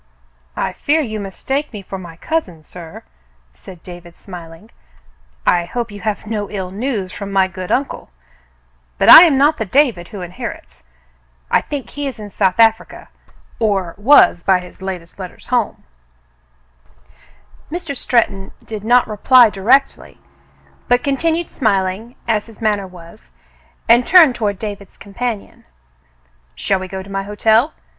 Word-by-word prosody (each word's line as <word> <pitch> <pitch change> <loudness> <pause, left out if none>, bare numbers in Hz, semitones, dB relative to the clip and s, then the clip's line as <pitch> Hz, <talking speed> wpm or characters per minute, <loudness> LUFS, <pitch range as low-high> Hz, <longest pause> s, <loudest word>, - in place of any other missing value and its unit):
"I - - -2
fear 310 +2 +1
you 220 -6 -4
mistake 265 +9 -4
me 210 -4 -8
for 195 0 -7
my 170 -3 -11
cousin, 185 - -3
sir," 165 +1 -11 0.5
said 165 - -14
David, 175 -1 -12
smiling. 175 +2 -12 0.7
"I 175 -1 +2
hope 235 +4 -4
you 205 -1 -10
have 215 -1 -3
no 210 -2 -4
ill 190 -3 -5
news 205 -3 -3
from 200 0 -7
my 190 -1 +3
good 185 -1 -7
uncle; 275 - -2 0.9
but - - +3
I 340 - +12
am 300 -5 +2
not 295 +3 +3
the - - 0
David 225 -6 +1
who 200 - -9
inherits. 175 - -8 0.7
I - - +4
think 285 -3 -6
he 290 -1 -4
is 250 -4 -7
in 205 -1 -9
South 190 +1 0
Africa 225 0 +2 0.3
— - - -31
or 190 -4 -2
was 205 -5 +5
by 185 0 +3
the 180 +1 -13
latest 180 -3 -7
home - - -26
letters." 185 - -10 2.3
Mr. 330 -4 -5
Stretton 210 -6 0
did 215 -2 -7
not 245 +2 +3
reply 225 +2 +5
directly, 245 +9 +1 0.7
but 245 0 +2
continued 325 +4 -1
smiling, 205 0 -1
as 220 -2 0
his 225 -3 -16
manner 210 -3 -1
was, 180 +3 -15 0.6
and 235 +2 +5
turned 320 -3 +6
toward 205 -4 -2
David's 200 -1 -8
companion. 215 +1 -6 0.9
"Shall 190 - -1
we 185 - -6
go 190 0 -6
to 200 - -13
my 195 0 -2
hotel 220 +7 +1
205 Hz, 150 wpm, -17 LUFS, 185-245 Hz, 2.3 s, I